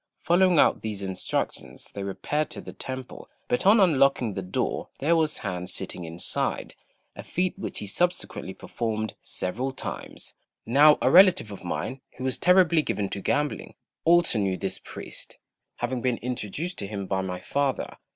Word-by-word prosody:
Following 180 0 +4
out - - +4
these 105 -2 -4
instructions 95 -1 -3
they 100 - -6
repaired 100 +11 -2
to - - -7
the - - -9
temple, 130 -1 -7 0.2
but 125 - +1
on 215 +3 +7
unlocking 140 - +4
the 95 - -3
door 90 0 -2
there 160 +5 +2
was 155 -2 +1
Han 90 -1 -3
sitting 90 - -4
inside 85 +1 -2 0.4
a - - -7
feat 180 +1 -1
which 195 - -5
he - - -4
subsequently 175 - -1
performed 110 -2 -3
several 125 +9 -3
times. 130 - -7 0.3
Now 145 +5 +6
a - - +4
relative 180 - +6
of 100 - -9
mine, 130 +9 -3 0.2
who 130 - -6
was 130 -1 -1
terribly 180 -3 +5
given 105 -9 -2
to 100 - -5
gambling, 145 +6 -1 0.3
also 170 -8 +4
knew 95 -2 0
this 95 -1 -3
priest, - - -9 0.4
having 120 +1 -2
been 125 -2 +1
introduced 125 - -4
to 100 - -3
him 100 -1 -4
by 95 0 -1
my 90 -1 -4
father. 140 +5 -1
125 Hz, 165 wpm, -26 LUFS, 100-160 Hz, 0.4 s, on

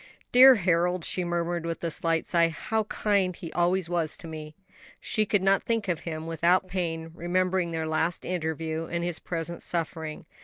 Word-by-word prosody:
"Dear 260 +1 +9
Harold!" 180 -2 +1
she 185 - -1
murmured, 175 -1 -1
with 165 0 -4
a 170 - -1
slight 165 +1 -1
sigh, 170 -1 +3
"how 215 +6 -2
kind 200 -4 +1
he 165 - -8
always 175 +1 +1
was 170 -3 -1
to 170 - -10
me." 155 -1 -8 0.4
She 215 -1 0
could 205 -3 +1
not 195 0 +4
think 225 -3 -1
of 175 -3 0
him 160 -1 -5
without 170 +3 +2
pain, 165 -3 -3
remembering 180 +1 0
their 160 -1 -2
last 160 +2 -1
interview 160 -2 -2
and 170 0 -2
his 175 -1 -2
present 170 0 -5
suffering. 160 -2 -3
170 Hz, 180 wpm, -27 LUFS, 165-185 Hz, 0.4 s, Dear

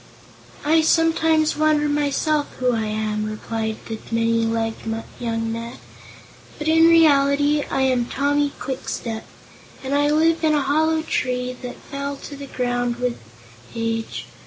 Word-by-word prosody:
"I 320 +2 +4
sometimes 320 -1 +3
wonder, 305 -1 +2
myself, 295 +1 +1
who 250 -1 +1
I 225 -1 -1
am," 215 0 -2
replied 220 +1 -3
the 225 -1 -5
many 230 0 +2
legged 225 0 -2 0.2
young 225 -1 -2
man; 230 +2 -6 0.8
"but, 305 - -4
in 325 +1 +6
reality, 290 -2 +4
I 270 - 0
am 255 -2 +2
Tommy 285 +3 0
Kwikstep, 230 -4 -4 0.6
and 265 +1 -3
I 290 +1 +3
live 320 +2 +2
in 310 -1 +3
a 295 - +2
hollow 315 +3 +1
tree 250 -4 -1
that 250 -1 -6
fell 280 0 -5
to 285 - -9
the 280 0 -8
ground 245 -2 -1
with 245 0 -2 0.6
age. 225 0 -3
270 Hz, 140 wpm, -22 LUFS, 230-300 Hz, 0.8 s, in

